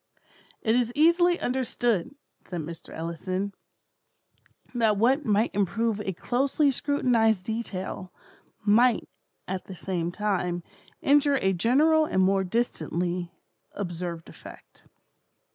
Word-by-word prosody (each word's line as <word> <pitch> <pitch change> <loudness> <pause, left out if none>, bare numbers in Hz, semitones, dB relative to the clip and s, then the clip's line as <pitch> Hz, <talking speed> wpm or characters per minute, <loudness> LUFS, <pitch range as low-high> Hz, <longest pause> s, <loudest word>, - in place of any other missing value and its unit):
"It 220 +1 +3
is 240 -1 +1
easily 345 +3 +4
understood," 245 -1 -1 0.3
says 175 - -6
Mr. 165 +1 -8
Ellison, 185 +4 -3 1.2
"that 225 -4 +2
what 260 +8 +3
might 215 +1 +2
improve 210 +2 0
a 195 - -2
closely 270 - +1
scrutinized 235 -8 +1
detail, 195 -4 -4 0.5
might, 230 +3 +4 0.4
at 185 0 -4
the 190 - -9
same 175 -2 -2
time, 180 -4 -1 0.4
injure 285 0 +4
a 190 -6 +1
general 300 - +4
and 190 -10 +1
more 195 +1 +3
distantly 180 -4 -2 0.4
observed 175 -3 -5
effect." - - -14
210 Hz, 110 wpm, -27 LUFS, 185-250 Hz, 1.2 s, easily